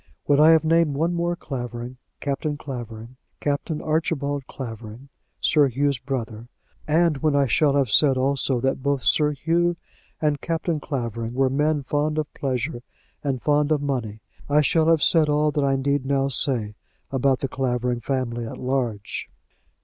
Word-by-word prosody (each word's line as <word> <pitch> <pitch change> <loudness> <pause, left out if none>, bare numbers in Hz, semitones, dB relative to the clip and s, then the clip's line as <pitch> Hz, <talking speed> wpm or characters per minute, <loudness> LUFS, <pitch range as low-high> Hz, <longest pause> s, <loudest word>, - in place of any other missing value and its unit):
When 145 0 +3
I 155 +1 +7
have 160 -1 +5
named 165 -2 +2
one 165 +4 0
more 175 0 -1
Clavering, 125 -4 -6 0.2
Captain 145 +1 -2
Clavering, 120 -3 -8 0.2
Captain 150 +2 -2
Archibald 145 -3 -1
Clavering, 115 +1 -8 0.3
Sir 150 -3 +4
Hugh's 140 +1 0
brother, 115 -4 -5 0.4
and 160 0 +3
when 150 0 +1
I 140 -1 +4
shall 145 +2 +2
have 135 -6 +1
said 135 +3 +5
also 135 -1 +1
that 135 0 0
both 140 -1 0
Sir 150 -1 +3
Hugh 170 +4 +1 0.4
and 150 -2 0
Captain 165 -1 -1
Clavering 120 -5 -4
were 135 0 +2
men 150 +1 +1
fond 150 +3 -1
of 155 -1 -3
pleasure 130 -1 -3 0.4
and 135 -4 -2
fond 150 0 +2
of 155 - +3
money, 115 -7 -3 0.3
I 150 +1 +4
shall 160 +2 +2
have 165 -2 +4
said 160 -3 +4
all 150 +1 +2
that 145 -1 0
I 135 -1 +2
need 140 0 0
now 135 0 0
say 120 -5 +2 0.4
about 135 0 +1
the 135 - 0
Clavering 125 -2 -1
family 120 -2 -2
at - - -7
large. 125 -6 -3
140 Hz, 165 wpm, -23 LUFS, 125-150 Hz, 0.4 s, I